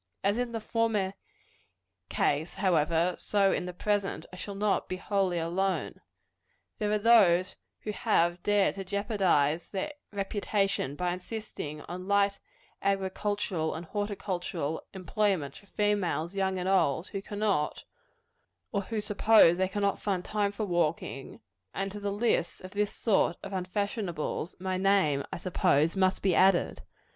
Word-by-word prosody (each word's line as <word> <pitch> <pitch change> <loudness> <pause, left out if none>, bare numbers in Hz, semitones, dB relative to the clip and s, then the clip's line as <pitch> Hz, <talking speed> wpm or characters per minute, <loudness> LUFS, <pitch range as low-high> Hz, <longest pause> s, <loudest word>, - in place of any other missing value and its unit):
As 200 +4 +2
in 245 -1 -1
the 230 - -3
former 220 -4 0 1.0
ease, 150 +4 0
however, 170 -2 +2
so 200 -2 +2
in 180 - -1
the - - -3
present, 205 +2 -1
I - - -6
shall 200 +2 -6
not 205 0 0
be 185 - -2
wholly 190 -2 0
alone. 185 +3 -1 0.8
There 210 -2 0
are 210 - +3
those 190 -5 +5 0.3
who 215 - -3
have 175 -5 +1
dared 205 0 +3
to 195 - -3
jeopardize 185 - +1
their 200 +10 -3 0.2
reputation 200 -6 -1
by 175 +2 -1
insisting 180 -6 -6
on 180 +4 -7
light 200 0 +2 0.4
agricultural 195 -3 -1
and 165 - -6
horticultural 180 -6 -3
employments 185 -5 -1
for 200 - -22
females, 200 -5 0
young 190 -1 0
and 180 0 -2
old, 180 -4 +2
who 195 - -4
cannot, 205 -6 -1 0.9
or 200 - 0
who 215 +2 -3
suppose 210 -4 +5
they 190 0 +2
cannot 200 +1 -1
find 190 -3 -1
time 205 -1 0
for 210 +1 -3
walking; 165 -6 -2 0.3
and 195 0 -2
to 205 - -6
the 205 0 -2
list 205 -4 0
of 185 - -9
this 205 +1 0
sort 195 -6 +1
of 195 - -7
unfashionables, 185 -3 -2
my 185 0 -2
name, 185 -8 +3
I - - -3
suppose, 165 -2 +2
must 190 0 +2
be 190 -2 +3
added. 185 0 +3
195 Hz, 145 wpm, -29 LUFS, 175-205 Hz, 1.0 s, those